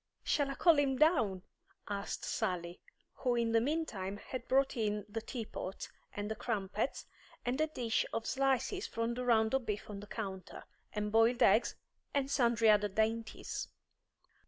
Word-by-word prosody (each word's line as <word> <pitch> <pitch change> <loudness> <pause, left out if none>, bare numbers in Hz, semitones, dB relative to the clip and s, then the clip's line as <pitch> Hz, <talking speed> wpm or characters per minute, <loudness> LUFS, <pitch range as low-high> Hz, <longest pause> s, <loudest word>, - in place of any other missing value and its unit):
"Shall 285 -3 +1
I 275 - -3
call 330 -2 +5
him 270 -2 +2
down?" 240 - +3 0.4
asked 200 0 -3
Sally, 180 -5 -2 0.3
who 250 -2 0
in 230 -1 +1
the 225 0 +4
meantime 230 -9 -2
had 255 +4 -7
brought 270 +1 +3
in 210 -3 -1
the 225 +2 -4
tea 225 0 -5
pot, 190 -2 -6 0.3
and 205 +1 -3
the - - -1
crumpets, 215 0 -2 0.4
and 255 +5 0
a 310 - +3
dish 240 -7 0
of 225 - -2
slices 270 - +1
from 230 +1 -1
the 250 +1 -3
round 220 -2 +3
of 265 -3 0
beef 210 0 -3
on 200 - -6
the 205 - -10
counter, 195 -4 -6 0.3
and 210 -1 -2
boiled 225 +2 +4
eggs, - - +4 0.4
and 275 -1 +1
sundry 235 -4 +4
other 210 0 +4
dainties. 220 +2 -1
230 Hz, 165 wpm, -34 LUFS, 210-260 Hz, 0.4 s, call